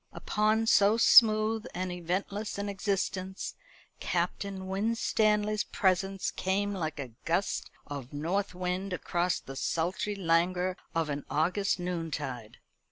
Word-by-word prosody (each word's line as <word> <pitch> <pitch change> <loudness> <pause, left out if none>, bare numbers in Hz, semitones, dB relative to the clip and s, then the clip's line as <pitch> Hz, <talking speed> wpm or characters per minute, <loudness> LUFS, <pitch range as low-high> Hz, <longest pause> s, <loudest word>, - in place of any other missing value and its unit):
Upon 215 +1 +1
so 210 0 +5
smooth 220 -1 +6
and 185 0 -2
eventless 190 +5 -3
an 200 0 -2
existence 190 -1 -2 0.5
Captain 195 -2 -2
Winstanley's 215 +1 +1
presence 195 -1 0
came 200 +2 -1
like 155 -5 -3
a 130 -4 -5
gust 170 +4 -1 0.2
of 140 -3 -7
north 180 +7 -2
wind 180 +1 -2
across 180 0 0
the 135 - -9
sultry 175 +8 -1
languor 180 0 +1 0.2
of 165 -2 0
an 140 0 -3
August 185 +6 +1
noontide. 160 -10 -4
190 Hz, 115 wpm, -30 LUFS, 170-205 Hz, 0.5 s, smooth